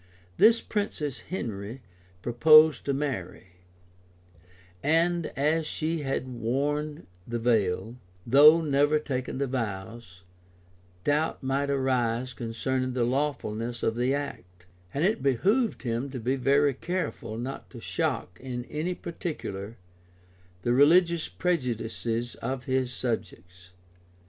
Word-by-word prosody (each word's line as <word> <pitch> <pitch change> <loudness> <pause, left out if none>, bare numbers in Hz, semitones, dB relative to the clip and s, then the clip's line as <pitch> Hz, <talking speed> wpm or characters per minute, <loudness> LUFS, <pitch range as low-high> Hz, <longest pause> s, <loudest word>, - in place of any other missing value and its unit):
This 230 +1 +6
princess 155 - -3
Henry 115 - -5 0.4
purposed 155 +4 +6
to 140 - 0
marry; 95 -11 -4 1.3
but 170 +2 +2
as 155 +3 +1
she 160 +1 -2
had 135 -2 -2
worn 140 +5 -2 0.2
the 120 0 -2
veil, 110 -1 0 0.3
though 150 +6 +7
never 145 0 +3
taken 130 -4 -3
the 140 - 0
vows, 110 -5 -5 0.8
doubts 150 0 0
might 135 +2 0
arise 130 -2 0
concerning 125 +3 -2
the 125 -1 +1
lawfulness 120 -3 -2
of 115 - +1
the 125 +2 +1
act; 90 -11 -7 0.3
and 145 - 0
it 205 -7 +1
behoved 195 - +1
him 120 +2 -2
to 130 -1 -6
be 125 +4 0
very 140 +2 +3
careful 130 -8 -4
not 130 +4 -6
to - - -10
shock, 90 0 -2
in 125 -2 -5
any 165 +4 -2
particular, 115 - -6 0.9
the 120 - +2
religious 165 +4 +4
prejudges 120 -7 -2
of 130 -1 -3
his 130 -1 0
subjects. 90 -7 -5
130 Hz, 115 wpm, -27 LUFS, 115-150 Hz, 1.3 s, though